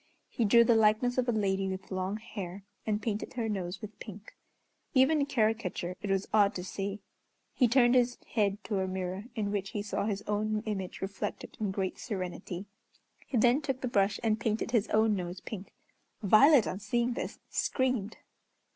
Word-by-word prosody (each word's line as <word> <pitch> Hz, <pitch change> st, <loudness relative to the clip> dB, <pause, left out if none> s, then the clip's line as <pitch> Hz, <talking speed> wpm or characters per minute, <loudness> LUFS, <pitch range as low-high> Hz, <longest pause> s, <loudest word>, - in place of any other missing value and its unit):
He 235 Hz, -, 0 dB
drew 235 Hz, +3 st, +7 dB
the 235 Hz, -, +4 dB
likeness 225 Hz, +3 st, +3 dB
of 250 Hz, -1 st, +1 dB
a -, -, +4 dB
lady 195 Hz, -3 st, 0 dB
with 190 Hz, 0 st, -5 dB
long 190 Hz, +2 st, -2 dB
hair, 200 Hz, -4 st, -7 dB, 0.2 s
and 210 Hz, -1 st, +1 dB
painted 210 Hz, -1 st, -3 dB
her 235 Hz, -3 st, -2 dB
nose 190 Hz, -3 st, -3 dB
with 210 Hz, 0 st, -8 dB
pink. 210 Hz, -1 st, -10 dB, 0.6 s
Even 265 Hz, +4 st, +5 dB
in 280 Hz, -, +2 dB
caricature 215 Hz, -7 st, 0 dB
it 205 Hz, -, -4 dB
was 195 Hz, 0 st, +1 dB
odd 205 Hz, -2 st, +4 dB
to 180 Hz, -, -4 dB
see. 195 Hz, +2 st, -4 dB, 0.5 s
He 250 Hz, -, +4 dB
turned 240 Hz, 0 st, +5 dB
his 245 Hz, -1 st, +3 dB
head 205 Hz, -2 st, 0 dB
to 205 Hz, -3 st, -1 dB
a 190 Hz, -, 0 dB
mirror 185 Hz, +2 st, -4 dB
in 205 Hz, -3 st, -1 dB
which 200 Hz, -1 st, -2 dB
he 205 Hz, -, -2 dB
saw 205 Hz, -1 st, -2 dB
his 205 Hz, -1 st, -2 dB
own 215 Hz, +1 st, -1 dB
image 195 Hz, -4 st, -4 dB
reflected 195 Hz, +1 st, -4 dB
in 210 Hz, -2 st, 0 dB
great 190 Hz, -1 st, -2 dB
serenity. 185 Hz, -2 st, -5 dB, 0.6 s
He 255 Hz, -, -1 dB
then 245 Hz, +5 st, +4 dB
took 270 Hz, -3 st, -3 dB
the 255 Hz, -, -1 dB
brush 200 Hz, -3 st, +2 dB
and 220 Hz, -1 st, +2 dB
painted 220 Hz, +1 st, -1 dB
his 225 Hz, -3 st, +2 dB
own 220 Hz, 0 st, +3 dB
nose 180 Hz, -1 st, -4 dB
pink. 195 Hz, 0 st, -8 dB, 0.5 s
Violet, 245 Hz, +6 st, +7 dB
on 185 Hz, -, -3 dB
seeing 235 Hz, +4 st, 0 dB
this, -, -, -4 dB
screamed. 255 Hz, -6 st, 0 dB
210 Hz, 185 wpm, -30 LUFS, 195-235 Hz, 0.6 s, drew